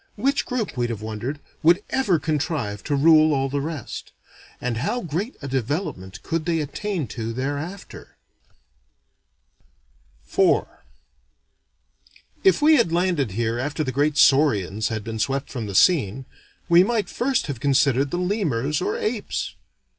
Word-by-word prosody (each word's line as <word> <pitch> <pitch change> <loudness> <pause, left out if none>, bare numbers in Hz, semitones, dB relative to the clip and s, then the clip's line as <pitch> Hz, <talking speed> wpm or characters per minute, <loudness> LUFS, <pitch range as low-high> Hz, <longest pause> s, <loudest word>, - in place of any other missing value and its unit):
Which 275 +1 0
group, 250 -5 -2
we'd 120 -1 -1
have 110 -2 -5
wondered, 110 +7 -4 0.2
would 170 +5 +4
ever 260 -10 +2
contrive 145 - -2
to 145 - 0
rule 155 +1 +5
all 135 0 0
the 140 +1 -1
rest? 150 -4 -6 0.5
And 125 -2 -2
how 235 - -1
great 180 - -4
a - - -4
development 130 - -3
could 165 -1 -2
they 165 -2 +1
attain 160 +3 -3
to 115 0 -4
thereafter? 145 - -6 2.1
IV 385 -1 +3 1.8
If 385 -6 +4
we 310 0 +7
had 230 -10 +2
landed 170 - 0
here 115 +2 -1
after 145 +4 -2
the 130 - -2
great 145 +3 +1
saurians 110 - +3
had 110 -2 -3
been 110 0 -5
swept 135 +5 -1
from 115 -5 -4
the 100 - -6
scene, 135 - +3 0.4
we 170 0 +6
might 220 0 0
first 260 +2 0
have 140 -5 -5
considered 140 0 +2
the 175 - -2
lemurs 160 - -1
or 420 +4 -1
apes. 435 -3 -3
145 Hz, 145 wpm, -23 LUFS, 125-180 Hz, 2.1 s, we